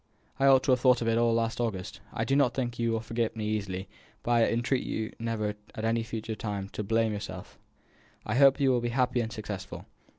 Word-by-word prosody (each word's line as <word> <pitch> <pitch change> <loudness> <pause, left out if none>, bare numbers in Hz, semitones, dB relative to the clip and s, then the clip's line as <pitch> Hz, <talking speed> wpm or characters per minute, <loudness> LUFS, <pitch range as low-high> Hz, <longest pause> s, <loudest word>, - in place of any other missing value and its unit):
I 135 - +4
ought 135 -1 +6
to 135 - +2
have 125 - +4
thought 125 -1 +4
of - - -2
it 115 0 +3
all 120 0 +3
last 115 +1 0
August. 100 -6 -3
I - - -2
do 135 - +1
not 135 -4 +3
think 120 -3 -2
you 115 0 +1
will 115 -1 0
forget 115 0 -2
me 110 -1 -3
easily, 100 -3 -2 0.4
but 120 - -1
I 115 -1 +4
entreat 120 +3 0
you 110 0 -3
never 115 -2 -1 0.2
at 110 - -3
any 115 +1 +1
future 115 0 -4
time 100 -3 -4
to - - -5
blame 115 +1 +1
yourself. 95 -3 -7 0.7
I 105 - -2
hope 135 +2 +6
you 135 -2 +4
will 125 -2 +2
be 120 - -1
happy 125 0 +1
and 115 -1 -4
successful. 105 -4 -6
115 Hz, 230 wpm, -29 LUFS, 110-120 Hz, 0.7 s, ought